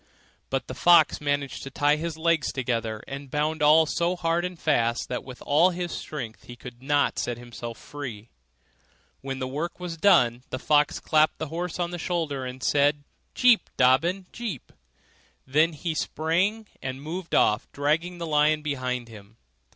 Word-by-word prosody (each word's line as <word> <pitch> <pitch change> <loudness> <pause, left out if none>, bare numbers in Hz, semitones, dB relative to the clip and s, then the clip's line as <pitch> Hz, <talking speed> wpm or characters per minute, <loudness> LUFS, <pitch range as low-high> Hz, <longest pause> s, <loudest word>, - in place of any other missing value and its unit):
But 135 0 -1
the - - -7
fox 160 +4 +5
managed 145 -2 -1
to 135 - -7
tie 145 +2 +2
his 165 0 -4
legs 160 -2 +1
together 115 -4 -2
and 135 0 -7
bound 150 +3 -1
all 155 +2 +6
so 170 +3 0
hard 170 -1 0
and 180 -1 -4
fast 120 -6 +1
that 125 - -3
with 130 -1 -10
all 155 +6 +4
his 175 -1 -4
strength 125 -7 -6
he 120 - -10
could 120 0 -11
not 145 +1 +1
set 120 -1 -2
himself 120 -1 -8
free. 120 -7 -8 0.9
When 135 -1 -4
the 130 -1 -3
work 150 +8 -4
was 175 -2 -5
done, 125 -10 +4
the 130 - -3
fox 150 +2 +2
clapped 155 0 +2
the 160 - -5
horse 175 +2 -4
on 175 0 -1
the 175 - -5
shoulder, 160 -6 -2
and 130 +1 -7
said, 145 0 +2 0.3
'Jip! 250 -3 +4
Dobbin! 165 +9 +3
Jip!' 220 - -6 0.7
Then 150 +5 +3
up 165 - -11
he 165 +2 -3
sprang, 180 +8 0 0.2
and 130 0 -4
moved 170 +3 -4
off, 105 +1 +2
dragging 160 +5 0
the 170 - -4
lion 150 0 +2
behind 130 -4 -2
him. 110 -1 -14
150 Hz, 175 wpm, -26 LUFS, 130-165 Hz, 0.9 s, all